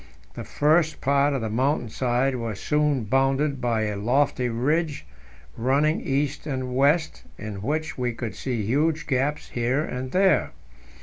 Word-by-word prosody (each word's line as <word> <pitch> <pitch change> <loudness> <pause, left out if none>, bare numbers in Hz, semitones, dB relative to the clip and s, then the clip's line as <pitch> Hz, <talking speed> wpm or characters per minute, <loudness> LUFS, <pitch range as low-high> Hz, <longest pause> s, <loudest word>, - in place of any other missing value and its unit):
The - - -6
first 155 +2 +2
part 140 +1 +2
of 135 - -2
the 110 - -2
mountain 130 +1 0
side 125 +3 0
was 115 -4 -4
soon 150 -4 +1
bounded 135 +4 +1
by 115 -3 0
a 105 -1 -2
lofty 125 +3 +1
ridge 145 +6 -1 0.5
running 140 +6 +1
east 140 +2 -2
and 130 -3 -3
west, 150 +5 +2 0.2
in 105 -2 -6
which 155 +5 -2
we 125 -1 0
could 115 -1 -5
see 120 -5 -3
huge 155 +7 +1
gaps 145 +1 -1
here 125 +5 0
and 130 -3 -5
there. 190 -3 +3
135 Hz, 150 wpm, -25 LUFS, 120-150 Hz, 0.5 s, there